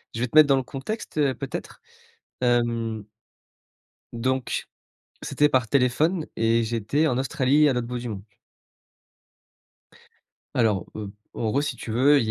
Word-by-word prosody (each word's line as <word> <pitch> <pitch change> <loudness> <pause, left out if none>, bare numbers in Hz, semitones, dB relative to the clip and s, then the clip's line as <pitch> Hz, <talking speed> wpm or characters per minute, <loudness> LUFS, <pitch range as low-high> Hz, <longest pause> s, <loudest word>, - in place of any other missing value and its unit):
Je - - -3
vais 125 - +1
te 120 - -11
mettre 155 -1 +9
dans 140 - +5
le 135 - 0
contexte, 155 - -6
heu, 140 -3 +2
peut-être, - - -6 0.6
hem. 115 -3 0 1.1
Donc, 130 +2 -1 0.6
c'était 150 - +2
par 130 -5 +1
téléphone 150 - +2
et 115 +1 +2
j'étais 115 +7 0
en 125 -5 +1
Australie 140 +1 +3
à - - +3
l'autre 125 -2 -2
bout 125 +1 -4
du 120 0 -5
monde. 100 -3 -5 2.3
Alors, 105 -6 +2
heu, 105 -2 -6 0.2
en 110 - -1
gros, 140 - +1
si 145 - -2
tu - - -8
veux, 135 +6 +5
il 110 -3 -1
125 Hz, 150 wpm, -25 LUFS, 115-140 Hz, 2.3 s, mettre